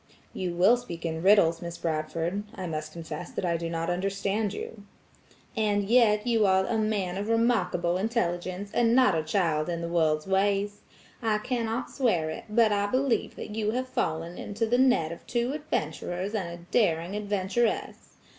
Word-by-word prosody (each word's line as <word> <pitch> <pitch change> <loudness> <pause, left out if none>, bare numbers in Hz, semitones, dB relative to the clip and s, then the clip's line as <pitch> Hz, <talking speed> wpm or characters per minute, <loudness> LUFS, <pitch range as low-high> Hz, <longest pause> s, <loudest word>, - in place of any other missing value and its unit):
"You 180 -2 -3
will 195 +8 +5
speak 170 -9 -8
in 160 -1 -2
riddles, 175 -4 +5
Miss 170 -1 -6
Bradford. 165 +4 -2
I 185 - -5
must 155 -2 -4
confess 160 0 -7
that - - -4
I 170 -1 +1
do 165 0 -3
not 165 0 -2
understand 195 +3 -1
you." 205 +1 -7 0.7
"And 210 -2 +1
yet 215 -2 +4
you 225 -4 +3
are 190 0 +3
a 235 - -1
man 200 -4 -1
of 205 +2 -3
remarkable 195 -7 +2
intelligence, 185 -2 -2
and 235 0 +3
not 255 -6 +5
a 160 - +1
child 160 -1 0
in 170 -1 -2
the 170 - -3
world's 155 -3 +1
ways. 200 +1 +1 0.4
I 220 -2 +1
cannot 230 +1 -2
swear 185 - +1
to - - -4
it, - - -11
but 220 0 +4
I 205 0 +1
believe 255 +2 0
that 210 - -7
you 215 0 -1
have 255 +1 -2
fallen 165 -4 -2
into 215 +3 -2
the 245 +3 +2
net 250 -12 +3
of 170 - -10
two 240 +2 0
adventurers 185 - -3
and 200 -5 -1
a 170 0 -9
daring 175 -3 +1
adventuress. 210 +2 -1
195 Hz, 180 wpm, -27 LUFS, 170-220 Hz, 0.7 s, will